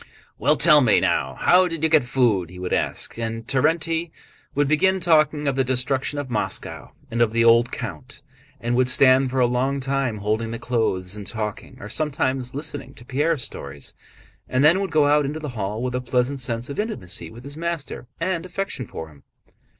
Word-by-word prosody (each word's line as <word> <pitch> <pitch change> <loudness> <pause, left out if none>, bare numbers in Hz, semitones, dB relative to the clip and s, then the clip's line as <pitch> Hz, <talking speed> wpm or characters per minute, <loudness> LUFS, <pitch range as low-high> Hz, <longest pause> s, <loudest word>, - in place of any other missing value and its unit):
"Well, 150 - +3
tell 150 -2 +7
me... 120 -5 +4
now, - - 0
how 180 +1 +4
did 165 -3 -5
you 160 - +4
get 155 -1 +5
food?" 120 -9 +1
he 90 - -12
would 90 0 -4
ask. - - -2
And 115 0 -4
Terénty 160 +5 0 0.5
would 145 0 +2
begin 190 +6 +3
talking 155 -4 +2
of 140 - +1
the 135 - +2
destruction 130 +2 0
of 145 -2 -3
Moscow, 125 - -4 0.2
and 115 +1 -1
of 115 -2 +3
the 115 +1 +2
old 115 +1 +5
count, 140 +2 -7 0.4
and 120 0 -1
would 125 0 +4
stand 130 0 +5
for 130 +1 -1
a 125 - +5
long 130 +3 0
time 135 -3 -1
holding 110 +2 -1
the 115 - -4
clothes 105 -6 -1
and 105 -2 -8
talking, 105 -2 -5
or 105 - -8
sometimes 130 -1 -1
listening 145 -2 -5
to 120 - -10
Pierre's 145 +2 0
stories, 70 0 -6 0.6
and 130 +2 +1
then 170 +6 +5
would 195 - -2
go 150 -2 +3
out 150 +1 +4
into 145 +3 -3
the 150 -2 -5
hall 110 -1 -4
with 125 -1 -2
a 125 - -1
pleasant 125 +2 0
sense 120 -1 -3
of 140 - -6
intimacy 90 - -4
with 120 +7 -12
his 140 +1 -8
master 165 -6 -4
and 170 -3 -1
affection 185 - -5
for 80 -1 -7
him. 70 -2 -18
130 Hz, 200 wpm, -23 LUFS, 115-150 Hz, 0.6 s, tell